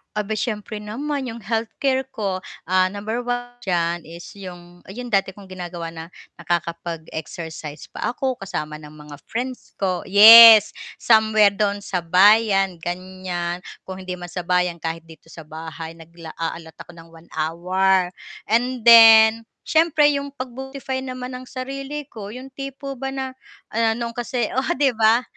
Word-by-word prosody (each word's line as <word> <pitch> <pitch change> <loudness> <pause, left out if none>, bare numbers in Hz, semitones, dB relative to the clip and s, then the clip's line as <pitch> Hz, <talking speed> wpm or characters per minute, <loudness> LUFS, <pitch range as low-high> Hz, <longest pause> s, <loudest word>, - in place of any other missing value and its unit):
Aba'y 210 +1 -2
siyempre 215 -1 -4
naman 270 +7 -4
yung 235 -2 -7
healthcare 230 +5 -1
ko, 195 -4 -2 0.3
ah, 185 0 +3
number 220 +4 -4
1 245 0 -3 0.2
diyan, 170 -2 -1
is 170 +1 -11
yung 175 -2 -12
yung 245 +6 -8
dati 195 -3 0
kong 195 0 -15
ginagawa 175 -2 -7
na 165 0 -8 0.3
nakakapag-exercise 165 -2 -5
pa - - -4
ako 260 0 -2
kasama 155 -7 -5
ng 150 -1 -13
mga 150 -1 -12
friends 250 +2 -6
ko. 185 -3 -1
Yes, 220 +1 +9 0.2
somewhere 220 -2 +4
do'n 200 0 -1
sa 185 -4 -4
bayan 195 +1 +4
ganiyan, 180 0 -5 0.2
kung 190 0 -7
hindi 185 - -5
man 175 -1 -8
sa 180 0 -6
bayan 180 -1 +1
kahit 165 0 -5
dito 165 0 -16
sa 160 -2 -12
bahay 160 +1 -8
nagla 165 0 -13
a-allot 165 0 -6
ako - - -12
ng 165 -1 -15
1 165 0 -18
hour. 180 +3 0 0.3
And 240 +2 -1
then 225 -1 +8
siyempre 315 -2 +3
yung 280 -1 -4
pag-beautify 265 +1 -6
naman 255 0 -6
ng 255 - -12
sarili 275 +3 -6
ko 210 0 -9
yung 260 +1 -10
tipo 275 0 -7
ba 270 0 -4
na 265 -1 -4 0.4
ah, 225 0 +1
noon 235 0 -4
kasi 240 0 -3
oo 260 +1 -1
'di 275 -1 +2
ba, 225 +2 +4
200 Hz, 155 wpm, -21 LUFS, 175-245 Hz, 0.4 s, Yes